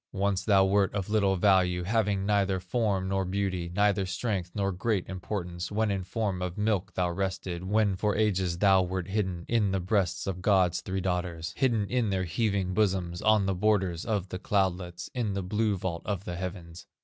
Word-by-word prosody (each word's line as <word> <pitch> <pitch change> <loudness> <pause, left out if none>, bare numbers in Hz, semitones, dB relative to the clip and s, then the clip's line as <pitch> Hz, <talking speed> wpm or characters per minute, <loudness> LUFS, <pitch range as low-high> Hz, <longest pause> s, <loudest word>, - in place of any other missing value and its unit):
Once 100 -1 0
thou 100 -3 +4
wert 100 0 +2
of 100 0 -3
little 100 -3 +3
value, 90 -2 +3
Having 100 -1 0
neither 100 -2 +2
form 95 0 -1
nor 95 0 0
beauty, 95 -2 -2
Neither 100 -1 +2
strength 95 -3 -2
nor 100 -1 0
great 100 +1 -1
importance, 90 -2 -5
When 110 0 +1
in 95 -1 -2
form 100 -2 -2
of 90 0 -4
milk 100 -3 0
thou 90 -1 +1
rested, 95 -1 -3
When 100 0 +2
for 105 +2 0
ages 95 -5 +1
thou 95 0 +5
wert 95 0 -3
hidden 95 -4 -2
In 115 -4 +2
the 95 0 0
breasts 90 -2 0
of 90 -2 -4
God's 90 -3 +3
three 95 0 -3
daughters, 90 -3 -2
Hidden 115 -6 +1
in 120 0 0
their 95 -1 0
heaving 95 +1 -1
bosoms, 95 -3 0
On 110 -2 +4
the 95 - +1
borders 95 -3 +1
of 100 -5 -2
the 90 - -5
cloudlets, 90 -3 -1
In 115 -5 -1
the 100 - -2
blue 105 +2 0
vault 85 -3 -3
of 100 -3 -3
the 90 - -4
heavens. 85 -2 -7
95 Hz, 190 wpm, -28 LUFS, 90-105 Hz, -, thou